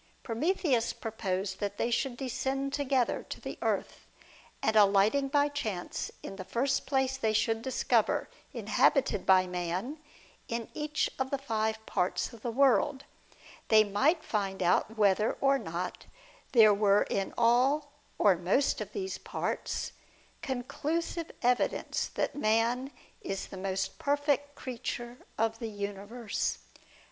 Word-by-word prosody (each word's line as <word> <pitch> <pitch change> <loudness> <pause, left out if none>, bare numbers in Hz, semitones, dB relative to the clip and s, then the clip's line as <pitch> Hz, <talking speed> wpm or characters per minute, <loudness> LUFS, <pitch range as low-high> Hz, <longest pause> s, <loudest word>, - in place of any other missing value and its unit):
Prometheus 265 0 +1
proposed 195 -3 -3
that 205 -1 -3
they 235 - 0
should 245 +1 0
descend 270 +2 -2
together 270 -4 +1
to - - -6
the - - -7
earth, - - -2 0.6
and 220 - +2
alighting 210 +6 +5
by 285 +1 +3
chance 220 -11 -3
in 195 - -7
the 185 - -5
first 260 +7 0
place 265 -1 +1
they 220 -5 0
should 225 +1 +1
discover 260 +2 +1 0.2
inhabited 260 -8 +2
by 185 -1 +6
man 180 - -3 0.5
in 230 -1 -3
each 300 -1 -1
of 265 0 0
the 280 - 0
five 220 -4 -2
parts 180 +6 -1
of 230 - -12
the 240 - -2
world, 275 +3 +3 0.6
they 215 -1 +7
might 275 - +2
find 195 -6 -2
out 195 +5 +2
whether 210 +1 +3
or 275 0 +2
not 170 0 -5 0.5
there 220 -4 +8
were 200 0 +4
in 195 -1 -2
all 260 +5 +3 0.3
or 200 -3 +5
most 185 +11 +1
of - - -6
these 385 -1 -4
parts - - -3 0.5
conclusive 310 +6 -3
evidence 245 0 +1
that - - -2
man 240 +2 +1 0.3
is 195 0 -4
the - - -10
most 190 0 -3
perfect 285 0 0
creature 240 -1 -5 0.2
of 225 0 0
the 230 - -4
universe. 205 +2 -3
230 Hz, 135 wpm, -30 LUFS, 205-275 Hz, 0.6 s, there